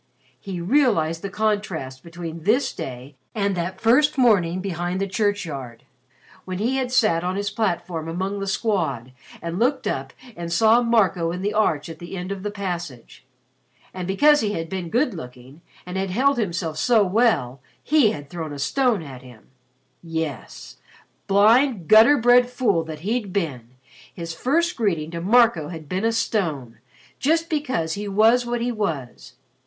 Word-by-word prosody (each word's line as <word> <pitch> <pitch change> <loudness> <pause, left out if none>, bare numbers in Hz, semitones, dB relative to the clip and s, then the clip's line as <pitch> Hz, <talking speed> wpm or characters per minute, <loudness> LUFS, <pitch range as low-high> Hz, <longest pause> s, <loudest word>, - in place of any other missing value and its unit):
He 190 +1 -6
realized 170 - +2
the 200 - -4
contrast 195 -11 -2
between 170 -1 -8
this 220 - +1
day 130 +2 -7 0.2
and 200 -2 0
that 180 +2 -4
first 285 +6 +3
morning 190 -9 +3
behind 180 -1 -3
the 195 - 0
churchyard, 180 - -3 0.6
when 185 -1 -5
he 240 +7 0
had 255 -2 -2
sat 215 -9 +2
on 180 +1 -2
his 200 0 -2
platform 175 -6 -2
among 190 +4 -3
the 195 - -4
Squad 190 - -1 0.3
and 170 +2 -4
looked 260 +4 +1
up 135 0 -3 0.2
and 170 -1 -6
saw 225 +6 +4
Marco 195 -8 +2
in 180 +2 -5
the 205 +1 -1
arch 165 -9 +1
at 165 -1 -9
the 175 +2 -7
end 180 +2 -5
of 195 -1 -5
the 210 - -3
passage. 170 - -6 0.7
And 185 -1 -5
because 295 +10 +4
he 210 -1 -1
had 165 -4 -4
been 185 -3 -4
good 245 - +1
looking 130 -1 -11 0.2
and 180 +1 -5
had 195 0 -2
held 260 +7 +2
himself 170 -6 -2
so 230 0 +4
well, 185 - +1 0.2
he 295 -7 +4
had 145 -6 -6
thrown 160 0 -6
a - - -7
stone 215 - +1
at 130 -4 -10
him. 125 -4 -16 0.5
Yes 160 -6 -6 0.5
blind 215 - +4
gutter 225 +7 +7
bred 245 +1 +5
fool 245 -9 +1
that 155 -1 -8
he'd 210 +1 -2
been: 130 - -4 0.4
his 165 -1 -6
first 330 - 0
greeting 165 -9 -1
to 170 -1 -5
Marco 215 -5 +3
had 160 -3 -8
been 185 +7 -2
a 225 - +3
stone, 155 - -2 0.4
just 325 +4 +1
because 260 - -1
he 205 +1 -5
was 225 +5 +3
what 240 0 -2
he 245 +1 0
was. 165 - -4
190 Hz, 170 wpm, -23 LUFS, 165-225 Hz, 0.7 s, gutter